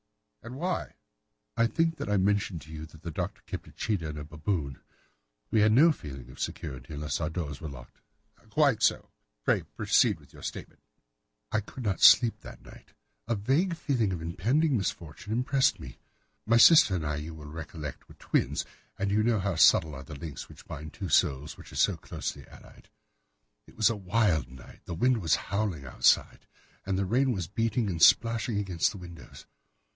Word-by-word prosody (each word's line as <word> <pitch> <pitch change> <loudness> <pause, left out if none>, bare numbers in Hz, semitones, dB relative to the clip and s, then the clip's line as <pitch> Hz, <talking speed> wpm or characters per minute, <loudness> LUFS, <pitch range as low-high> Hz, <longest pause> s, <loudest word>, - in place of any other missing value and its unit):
"And 120 +3 -9
why?" 175 +5 -3 0.6
"I 115 0 +3
think 165 +5 0
that - - -5
I 105 - +2
mentioned 100 -3 0
to 75 - -14
you 80 0 -7
that 80 0 -17
the 85 - -5
Doctor - - -5
kept - - -7
a - - -13
cheetah 95 -8 -2
and 75 - -6
a 75 - -5
baboon. 75 -2 -3 0.7
We 110 - +3
had 105 +1 +5
no 150 +9 +6
feeling 65 - -8
of - - -15
security 65 +2 -5
unless 75 +3 -3
our 75 - -1
doors 80 -4 -5
were 80 - -5
locked." 65 -3 -13 0.5
"Quite 140 -2 +2
so. 115 - +1 0.3
Pray - - +3
proceed - - +1
with - - -21
your - - -14
statement." - - -7 0.7
"I - - +2
could 115 +5 -9
not 100 -4 -1
sleep 120 -3 +7
that - - -12
night. - - -16 0.3
A 115 - 0
vague 140 - +1
feeling 125 - 0
of 85 -3 -4
impending 125 - +1
misfortune 90 -2 -4
impressed 130 +4 +2
me. 60 - -10 0.5
My 115 +1 +5
sister 150 - +7
and 80 -4 -3
I, 75 0 -2
you 80 +2 -7
will 75 -1 -11
recollect, 80 -1 -8
were - - -14
twins, - - -1 0.3
and 100 0 -1
you 105 +1 +3
know 115 0 +2
how 95 -1 -1
subtle 80 -1 +5
are 70 0 -8
the 75 +1 -10
links 75 0 -8
which - - -14
bind 75 +1 -8
two - - -6
souls 70 +3 +1
which - - -14
are - - -11
so - - +3
closely - - -6
allied. - - -17 0.8
It - - -19
was 110 +1 +4
a - - -2
wild 90 - +1
night. 65 0 -14
The 85 - -5
wind 125 +5 +2
was 85 - +3
howling 100 -8 -3
outside, 65 - +2 0.4
and 95 -1 0
the 100 - 0
rain 130 +7 +2
was 95 -7 -2
beating 115 +5 -1
and 85 -2 -4
splashing 115 +2 +4
against 95 -5 0
the 105 - -9
windows. 85 -2 -12
95 Hz, 190 wpm, -28 LUFS, 75-115 Hz, 0.8 s, sleep